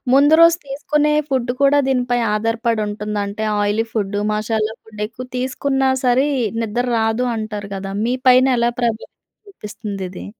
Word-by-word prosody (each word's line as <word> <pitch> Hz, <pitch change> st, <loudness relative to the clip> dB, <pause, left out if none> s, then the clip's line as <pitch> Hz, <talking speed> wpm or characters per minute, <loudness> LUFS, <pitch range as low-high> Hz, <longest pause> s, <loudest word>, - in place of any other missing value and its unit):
ముందు 290 Hz, +3 st, +6 dB
రోజు 335 Hz, 0 st, +7 dB
తీసుకునే 300 Hz, +2 st, 0 dB, 0.2 s
ఫుడ్డు 255 Hz, -2 st, 0 dB
కూడా 280 Hz, +1 st, +5 dB
దీనిపై 245 Hz, -2 st, +1 dB, 0.2 s
ఆధారపడుంటుందా? 215 Hz, -2 st, -1 dB
అంటే 215 Hz, +2 st, -4 dB, 0.2 s
ఆయిలీ 205 Hz, +2 st, +1 dB
ఫుడ్డు. 205 Hz, -2 st, -1 dB
మసాలా 215 Hz, 0 st, -1 dB
ఫుడ్. 215 Hz, -1 st, -9 dB
ఎక్కువ 245 Hz, +3 st, -9 dB
తీసుకున్నా 265 Hz, +1 st, 0 dB, 0.2 s
సరే 250 Hz, +3 st, +3 dB, 0.4 s
నిద్దర 240 Hz, +3 st, -2 dB
రాదు 225 Hz, +3 st, 0 dB
అంటారు 210 Hz, -2 st, -5 dB
గదా! 195 Hz, 0 st, -5 dB
మీ 245 Hz, -, 0 dB
పైన 255 Hz, +1 st, +6 dB
ఎలా 235 Hz, 0 st, +2 dB
ప్రభావితం 230 Hz, -2 st, -2 dB, 0.4 s
చూపిస్తుంది 210 Hz, -, -7 dB
ఇది? 185 Hz, -, -9 dB
230 Hz, 145 wpm, -19 LUFS, 210-260 Hz, 0.4 s, రోజు